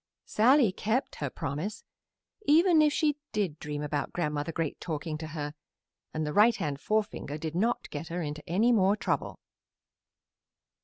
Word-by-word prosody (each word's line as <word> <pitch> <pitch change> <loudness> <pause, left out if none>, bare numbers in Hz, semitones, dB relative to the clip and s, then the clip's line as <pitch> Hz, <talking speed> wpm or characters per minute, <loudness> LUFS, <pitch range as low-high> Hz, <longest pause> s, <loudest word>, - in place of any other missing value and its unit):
Sallie 245 0 +4
kept 225 +8 -1
her 145 - -2
promise, 160 +10 -4 0.6
even 325 +2 +6
if 300 -1 +4
she 300 -1 +1 0.2
did 185 -8 -1
dream 150 -1 -4
about 145 -1 -2
Grandmother 150 -2 -2
Great 160 -2 -3
talking 155 -1 -3
to 160 - -5
her, 150 -2 -5 0.6
and 155 0 -2
the 150 - -3
right 220 +3 +6
hand 145 -2 -3
forefinger 210 -9 -1
did 160 0 -4
not 225 +8 0
get 150 +2 -5
her 170 +1 -3
into 150 0 -5
any 215 +8 +3
more 200 -3 +4
trouble. - - -2
170 Hz, 155 wpm, -29 LUFS, 150-220 Hz, 0.6 s, even